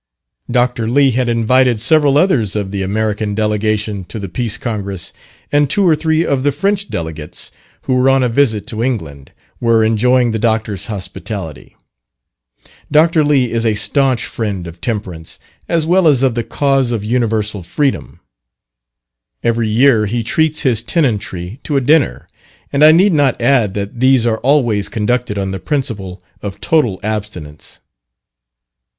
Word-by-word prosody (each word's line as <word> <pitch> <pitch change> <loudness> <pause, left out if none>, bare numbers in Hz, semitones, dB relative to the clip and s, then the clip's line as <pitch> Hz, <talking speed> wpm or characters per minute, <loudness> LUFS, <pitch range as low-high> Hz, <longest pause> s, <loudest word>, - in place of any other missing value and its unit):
Dr. 120 -2 0
Lee 135 +2 +3
had 125 0 0
invited 120 +1 +2
several 145 +4 +3
others 125 - +2
of 100 -2 -3
the 100 -1 -3
American 105 +1 -2
delegation 105 -1 -1
to 110 - -8
the 100 -2 -5
Peace 115 +4 -3
Congress, 100 -7 -5 0.4
and 145 -1 +2
two 200 +3 +2
or 160 - +5
three 160 +1 0
of 140 -2 0
the 145 +2 +1
French 200 +6 -1
delegates 80 0 -6 0.3
who 130 - -1
were 130 +1 +3
on 135 -1 +3
a - - +2
visit 115 -4 +1
to 115 -3 -5
England, 80 - -4 0.3
were 115 -2 +3
enjoying 120 +2 +2
the 110 - -2
Doctor's 110 -3 -1
hospitality. 95 - -7 1.2
Dr. 160 +1 +4
Lee 140 -5 +2
is 115 -1 -1
a 110 -2 +1
staunch 130 +3 +1
friend 100 -6 -4
of 85 0 -11
Temperance, 95 -8 -5 0.3
as 165 -2 +1
well 180 +1 +3
as 135 -4 +3
of 130 -3 +2
the 120 0 -2
cause 135 -1 0
of 115 -3 -2
universal 110 -3 -1
freedom. 135 - -2 1.2
Every 115 -1 +1
year 110 -1 +3
he 115 +3 -2
treats 155 +6 0
his 120 -5 +1
tenantry 110 - -2
to 145 - -2
a - - +4
dinner, 145 +2 +1 0.5
and 140 +1 +3
I 155 - +9
need 180 +4 +4
not 140 -4 +2
add 120 -5 +2
that 100 +3 -5
these 130 -2 +4
are 110 -1 0
always 120 -7 +1
conducted 115 -1 -1
on 95 -1 -2
the 95 - -4
principle 100 -9 -3 0.2
of 100 -1 -6
total 120 - +1
abstinence. 100 -9 -6
115 Hz, 155 wpm, -16 LUFS, 105-135 Hz, 1.2 s, I